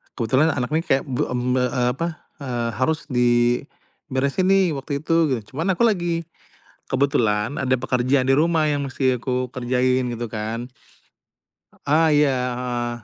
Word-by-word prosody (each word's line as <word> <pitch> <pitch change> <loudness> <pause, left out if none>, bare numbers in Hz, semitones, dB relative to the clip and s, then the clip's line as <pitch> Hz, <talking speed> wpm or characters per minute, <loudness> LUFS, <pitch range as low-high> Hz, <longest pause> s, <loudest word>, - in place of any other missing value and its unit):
kebetulan 135 +6 +2
anak 125 +1 -2
nih 160 +1 +1
kayak, 135 - +2
bu 130 -2 -2
mmm, 125 0 -1
ba 125 - +2
eee, 125 0 0
apa, 165 +7 -3 0.3
eee, 120 -4 -2
harus 155 +5 +1
diberesin 125 +5 0
nih 190 -3 +4
waktu 140 +1 -4
itu, 165 - 0
gitu. 130 -4 0
Cuman, 165 +7 -1
aku 235 - +1
lagi, 175 -7 +1 0.7
kebetulan 120 -4 +1
ada 130 0 +2
pekerjaan 130 +1 +1
di 135 - +4
rumah 160 +1 +2
yang 145 -2 -1
masih 130 -2 0
aku 125 0 -1
kerjain 125 0 0
gitu 120 0 -4
kan. 110 +2 -4 1.2
A 160 +2 +4
ah, - - +4
iya 145 -2 +3 0.2
heeh. 120 -1 -3
130 Hz, 155 wpm, -22 LUFS, 125-150 Hz, 1.2 s, nih